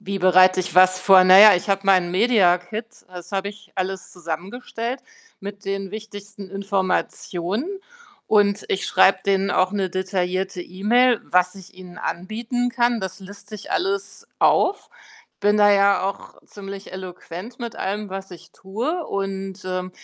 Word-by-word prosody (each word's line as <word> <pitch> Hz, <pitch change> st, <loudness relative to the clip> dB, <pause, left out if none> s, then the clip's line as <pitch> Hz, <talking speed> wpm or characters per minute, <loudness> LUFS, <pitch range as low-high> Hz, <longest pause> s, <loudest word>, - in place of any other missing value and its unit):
Wie 200 Hz, -1 st, -5 dB
bereite 185 Hz, 0 st, +5 dB
ich 180 Hz, -, -5 dB
was 185 Hz, 0 st, +5 dB
vor? 190 Hz, -1 st, +6 dB
Na 185 Hz, +1 st, +8 dB
ja, 215 Hz, 0 st, +9 dB
ich 175 Hz, -, -6 dB
habe 195 Hz, -1 st, +1 dB
meinen 185 Hz, -3 st, +3 dB
Mediakit, 200 Hz, -1 st, +2 dB, 0.2 s
das 180 Hz, 0 st, -11 dB
habe 195 Hz, 0 st, -2 dB
ich 205 Hz, -1 st, -14 dB
alles 190 Hz, 0 st, -4 dB
zusammengestellt 215 Hz, -, -6 dB, 0.4 s
mit 200 Hz, +1 st, -9 dB
den 195 Hz, -1 st, -4 dB
wichtigsten 205 Hz, -2 st, -9 dB
Informationen 195 Hz, -, -2 dB, 0.6 s
und 205 Hz, -1 st, +2 dB
ich 195 Hz, -, -1 dB
schreibe 195 Hz, -, +4 dB
denen 195 Hz, 0 st, +1 dB
auch 185 Hz, 0 st, +1 dB
'ne 195 Hz, -2 st, -1 dB
detaillierte 185 Hz, 0 st, -2 dB
E-Mail, 230 Hz, +7 st, +2 dB
was 180 Hz, +1 st, +1 dB
ich 190 Hz, -2 st, -14 dB
ihnen 180 Hz, -1 st, -12 dB
anbieten 230 Hz, +7 st, -3 dB
kann. 240 Hz, -1 st, +1 dB
Das 190 Hz, -1 st, -6 dB
liste 205 Hz, +2 st, -11 dB
ich 210 Hz, -, -8 dB
alles 200 Hz, -, -3 dB
auf, 400 Hz, +2 st, +2 dB, 0.5 s
bin 205 Hz, +1 st, +3 dB
da 205 Hz, -1 st, +5 dB
ja 200 Hz, -1 st, +3 dB
auch 200 Hz, -, -9 dB
ziemlich 195 Hz, -1 st, -10 dB
eloquent 185 Hz, +4 st, -9 dB
mit 235 Hz, -2 st, -6 dB
allem, 205 Hz, +2 st, -4 dB
was 195 Hz, 0 st, -7 dB
ich 175 Hz, -1 st, -13 dB
tue 245 Hz, -, -4 dB
und, 195 Hz, -2 st, -5 dB
ähm, 185 Hz, 0 st, -4 dB
195 Hz, 155 wpm, -22 LUFS, 185-210 Hz, 0.6 s, ja